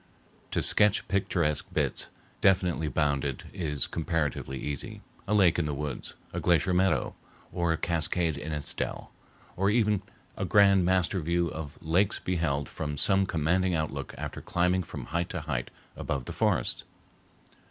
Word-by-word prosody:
To -, -, 0 dB
sketch 105 Hz, 0 st, +3 dB
picturesque 85 Hz, -5 st, 0 dB
bits, -, -, 0 dB, 0.3 s
definitely 90 Hz, -4 st, +3 dB
bounded, 70 Hz, -2 st, 0 dB
is 75 Hz, -7 st, -1 dB
comparatively 80 Hz, -5 st, -2 dB
easy—a 75 Hz, +8 st, -5 dB
lake 90 Hz, -5 st, +5 dB
in 80 Hz, -, 0 dB
the 75 Hz, -, -2 dB
woods, 75 Hz, -1 st, -4 dB, 0.2 s
a -, -, -2 dB
glacier 85 Hz, 0 st, +3 dB
meadow, 95 Hz, +2 st, +2 dB, 0.4 s
or 85 Hz, -1 st, 0 dB
a 80 Hz, -, +1 dB
cascade 85 Hz, 0 st, +1 dB
in 75 Hz, +3 st, -5 dB
its 75 Hz, -1 st, -3 dB
dell; -, -, -4 dB, 0.4 s
or 100 Hz, +2 st, +2 dB
even 105 Hz, -2 st, +2 dB, 0.3 s
a -, -, -3 dB
grand 100 Hz, -2 st, +5 dB
master 95 Hz, +1 st, +2 dB
view 85 Hz, +1 st, +1 dB
of 75 Hz, -2 st, -7 dB
mountains 90 Hz, +5 st, +2 dB
beheld 80 Hz, -6 st, -1 dB
from 75 Hz, -2 st, -4 dB
some 95 Hz, +4 st, +3 dB
commanding 90 Hz, +2 st, +1 dB
outlook 75 Hz, -3 st, -3 dB
after -, -, -5 dB
climbing 90 Hz, +1 st, +1 dB
from 85 Hz, -, -7 dB
height 85 Hz, +1 st, -2 dB
to 90 Hz, -, -3 dB
height 70 Hz, -6 st, -3 dB, 0.3 s
above 70 Hz, -3 st, -3 dB
the -, -, -6 dB
forests. -, -, 0 dB
85 Hz, 150 wpm, -29 LUFS, 75-95 Hz, 0.4 s, lake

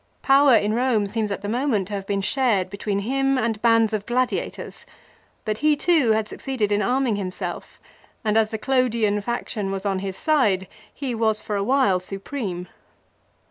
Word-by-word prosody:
Power 275 Hz, -1 st, +6 dB
in 210 Hz, -1 st, +2 dB
Eome 235 Hz, -4 st, +1 dB
seems 215 Hz, +1 st, -2 dB
at 200 Hz, -, -4 dB
the -, -, -3 dB
moment 225 Hz, -4 st, 0 dB
to -, -, -6 dB
have 195 Hz, -1 st, -4 dB
been 200 Hz, -1 st, 0 dB
shared 205 Hz, -5 st, +1 dB
between 200 Hz, 0 st, -2 dB
him 270 Hz, +4 st, +1 dB
and 225 Hz, -3 st, -1 dB
bands 230 Hz, -2 st, +3 dB
of 210 Hz, -1 st, -3 dB
gladiators; 250 Hz, +1 st, -2 dB, 0.6 s
but 215 Hz, 0 st, -2 dB
he 305 Hz, 0 st, +3 dB
too 295 Hz, -7 st, +3 dB
had 215 Hz, -1 st, 0 dB
suc -, -, -10 dB
ceeded 240 Hz, -6 st, -1 dB
in 205 Hz, 0 st, +2 dB
arming 245 Hz, 0 st, +1 dB
himself, 185 Hz, -2 st, -5 dB, 0.5 s
and 215 Hz, 0 st, +1 dB
as 220 Hz, -1 st, +3 dB
the 220 Hz, -, -3 dB
Clodian 230 Hz, -4 st, +1 dB
faction 215 Hz, -2 st, -3 dB
was 195 Hz, +1 st, -4 dB
on 195 Hz, -2 st, 0 dB
his 190 Hz, -1 st, -5 dB
side 215 Hz, -, +2 dB, 0.2 s
he 270 Hz, -4 st, -4 dB
was, 220 Hz, -2 st, 0 dB
for 210 Hz, -, -3 dB
a 200 Hz, -, 0 dB
while, 255 Hz, -5 st, +3 dB
supreme. 195 Hz, -1 st, -5 dB
220 Hz, 180 wpm, -23 LUFS, 200-255 Hz, 0.6 s, Power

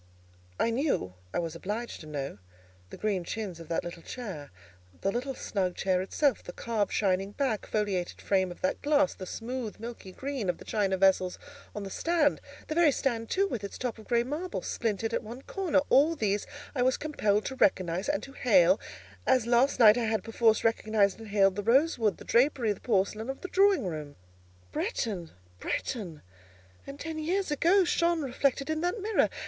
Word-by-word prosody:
I 230 Hz, -, +2 dB
knew—I 95 Hz, -, -2 dB
was 165 Hz, -2 st, -2 dB
obliged 210 Hz, +7 st, -4 dB
to 155 Hz, -, -10 dB
know—the 90 Hz, -10 st, -9 dB
green 200 Hz, -4 st, -1 dB
chintz 190 Hz, -2 st, -5 dB
of 165 Hz, -, -10 dB
that 165 Hz, -, -1 dB
little 170 Hz, -1 st, -7 dB
chair; 190 Hz, -, -7 dB, 0.5 s
the 195 Hz, -, +1 dB
little 255 Hz, +4 st, -3 dB
snug 185 Hz, -3 st, -2 dB
chair 185 Hz, -1 st, +1 dB
itself, 265 Hz, +7 st, +1 dB
the 175 Hz, -, -9 dB
carved, 220 Hz, -4 st, -1 dB
shining 195 Hz, 0 st, 0 dB
black, 255 Hz, -6 st, -1 dB
foliated 200 Hz, -5 st, -1 dB
frame 190 Hz, -2 st, +1 dB
of 175 Hz, -, -10 dB
that 280 Hz, +1 st, 0 dB
glass; 290 Hz, -1 st, +3 dB
the 185 Hz, -, -8 dB
smooth, 235 Hz, 0 st, -5 dB
milky 230 Hz, -4 st, -8 dB
green 265 Hz, -2 st, -3 dB
of 175 Hz, -, 0 dB
the -, -, -13 dB
china 195 Hz, -3 st, 0 dB
vessels 185 Hz, -1 st, +3 dB, 0.4 s
on 210 Hz, -, -4 dB
the 195 Hz, -, -6 dB
stand; 330 Hz, -, +1 dB, 0.3 s
the -, -, -2 dB
very 330 Hz, -2 st, +5 dB
stand 230 Hz, -4 st, -1 dB
too, 395 Hz, +1 st, +2 dB
with 230 Hz, -, -4 dB
its 200 Hz, -, -6 dB
top 245 Hz, -3 st, -3 dB
of 215 Hz, -, -13 dB
grey 235 Hz, -1 st, +3 dB
marble, 305 Hz, +8 st, -4 dB
splintered 225 Hz, 0 st, -2 dB
at -, -, 0 dB
one 235 Hz, +5 st, -9 dB
corner;—all 315 Hz, -4 st, +2 dB
these 205 Hz, -6 st, 0 dB, 0.3 s
I 260 Hz, -, -1 dB
was 255 Hz, +1 st, +3 dB
compelled 215 Hz, -9 st, 0 dB
to 265 Hz, -, -4 dB
recognise 185 Hz, -4 st, +1 dB
and 295 Hz, 0 st, 0 dB
to 275 Hz, -, -9 dB
hail, 190 Hz, -7 st, +4 dB, 0.5 s
as 255 Hz, -3 st, +4 dB
last 245 Hz, +3 st, +3 dB
night 220 Hz, 0 st, +8 dB
I 235 Hz, -, 0 dB
had, 220 Hz, -3 st, 0 dB
perforce, 225 Hz, -1 st, +2 dB
recognised 215 Hz, -2 st, +2 dB
and 225 Hz, -, -9 dB
hailed 195 Hz, -2 st, +3 dB
the 205 Hz, -, -2 dB
rosewood, 235 Hz, -, +3 dB
the -, -, -12 dB
drapery, 240 Hz, -3 st, +3 dB
the -, -, -15 dB
porcelain, 215 Hz, +1 st, 0 dB
of 270 Hz, -, -5 dB
the 370 Hz, -, -6 dB
drawing 390 Hz, -, +4 dB
room. 155 Hz, -4 st, -5 dB, 0.6 s
Bretton! 180 Hz, -, -2 dB, 0.3 s
Bretton! 185 Hz, -, -4 dB, 0.6 s
and 275 Hz, +1 st, -8 dB
ten 320 Hz, +1 st, -4 dB
years 360 Hz, +3 st, -1 dB
ago 350 Hz, +6 st, +4 dB
shone 340 Hz, -2 st, +1 dB
reflected 275 Hz, +1 st, 0 dB
in 315 Hz, 0 st, -1 dB
that 355 Hz, +6 st, -1 dB
mirror. 425 Hz, +2 st, +2 dB
225 Hz, 185 wpm, -29 LUFS, 190-275 Hz, 0.6 s, night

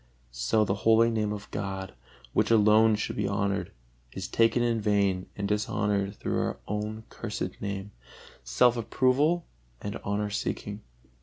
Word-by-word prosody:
So -, -, +1 dB
the 95 Hz, -, 0 dB
holy 115 Hz, +1 st, +5 dB
Name 105 Hz, -2 st, 0 dB
of 105 Hz, -1 st, -7 dB
God, 95 Hz, -2 st, -4 dB, 0.4 s
which -, -, +2 dB
alone 110 Hz, 0 st, +5 dB
should 105 Hz, -, -3 dB
be 105 Hz, -1 st, 0 dB
honored, 100 Hz, 0 st, -1 dB, 0.4 s
is 95 Hz, 0 st, -5 dB
taken 115 Hz, +3 st, +3 dB
in 115 Hz, -2 st, +1 dB
vain 100 Hz, -3 st, +1 dB
and 100 Hz, -1 st, -2 dB
dishonored 105 Hz, -1 st, 0 dB
through -, -, -2 dB
our -, -, -2 dB
own 105 Hz, +2 st, -3 dB
cursed 105 Hz, -3 st, -5 dB
name, 100 Hz, 0 st, -4 dB, 0.5 s
self 115 Hz, -, +3 dB
approval 135 Hz, +8 st, +2 dB, 0.3 s
and 100 Hz, -, -5 dB
honor 105 Hz, +1 st, -1 dB
seeking. 105 Hz, +1 st, -3 dB
105 Hz, 145 wpm, -28 LUFS, 100-110 Hz, 0.5 s, holy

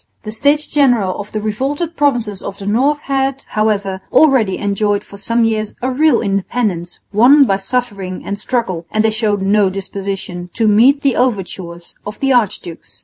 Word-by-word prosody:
The 215 Hz, -, -6 dB
States 285 Hz, +7 st, +1 dB
General 245 Hz, -10 st, +2 dB
of 205 Hz, 0 st, -7 dB
the 215 Hz, -, -2 dB
revolted 280 Hz, +10 st, -2 dB
provinces 240 Hz, -, 0 dB
of 195 Hz, -, -7 dB
the 195 Hz, -, -8 dB
north 270 Hz, +8 st, +1 dB
had, 270 Hz, -1 st, -1 dB
however, 200 Hz, -3 st, -1 dB
already 255 Hz, -11 st, +4 dB
enjoyed 205 Hz, 0 st, 0 dB
for 200 Hz, -, -13 dB
some 230 Hz, +3 st, 0 dB
years 215 Hz, -2 st, -1 dB
a 255 Hz, +2 st, -2 dB
real 305 Hz, +4 st, +3 dB
independence 195 Hz, -3 st, -2 dB, 0.2 s
won 260 Hz, +7 st, +6 dB
by 195 Hz, -5 st, +1 dB
suffering 195 Hz, -3 st, -3 dB
and 200 Hz, 0 st, -4 dB
struggle 185 Hz, -11 st, -2 dB
and 215 Hz, 0 st, 0 dB
they 220 Hz, -, +2 dB
showed 210 Hz, -2 st, 0 dB
no 200 Hz, 0 st, +3 dB
disposition 190 Hz, -2 st, -5 dB
to 225 Hz, -, +1 dB
meet 245 Hz, +7 st, +4 dB
the 275 Hz, -3 st, +2 dB
overtures 185 Hz, -7 st, -2 dB
of 210 Hz, +1 st, -8 dB
the 270 Hz, -1 st, +2 dB
archdukes. 195 Hz, -8 st, -2 dB
215 Hz, 170 wpm, -16 LUFS, 195-255 Hz, 0.2 s, won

